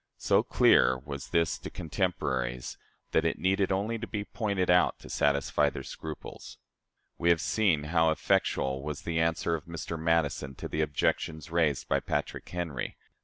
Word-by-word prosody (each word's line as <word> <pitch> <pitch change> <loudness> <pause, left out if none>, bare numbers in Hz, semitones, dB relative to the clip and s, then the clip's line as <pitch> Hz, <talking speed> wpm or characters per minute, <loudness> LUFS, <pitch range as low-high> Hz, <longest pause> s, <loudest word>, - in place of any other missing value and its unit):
So - - +3
clear 65 - +4
was 70 +1 -7
this 85 -1 +1
to - - -7
contemporaries, 65 -8 -2 0.4
that 80 - +3
it 85 - 0
needed 95 +1 +1
only 105 +4 0
to 120 - -5
be 105 -2 -3
pointed 100 -6 0
out 90 0 +4
to - - -10
satisfy 70 0 +2
their - - -7
scruples. 80 -2 -8 0.6
We 85 - +2
have 85 -1 +5
seen 90 -6 +2
how 80 +1 +3
effectual 65 -3 +1
was 75 0 -5
the 80 -1 -1
answer 80 0 +1
of 80 -3 -3
Mr. 85 0 -5
Madison 80 -4 0
to - - -6
the 80 - -1
objections 80 +1 -1
raised 80 -5 +1
by - - +2
Patrick 75 0 -3
Henry. 85 -7 -4
80 Hz, 165 wpm, -29 LUFS, 75-90 Hz, 0.6 s, have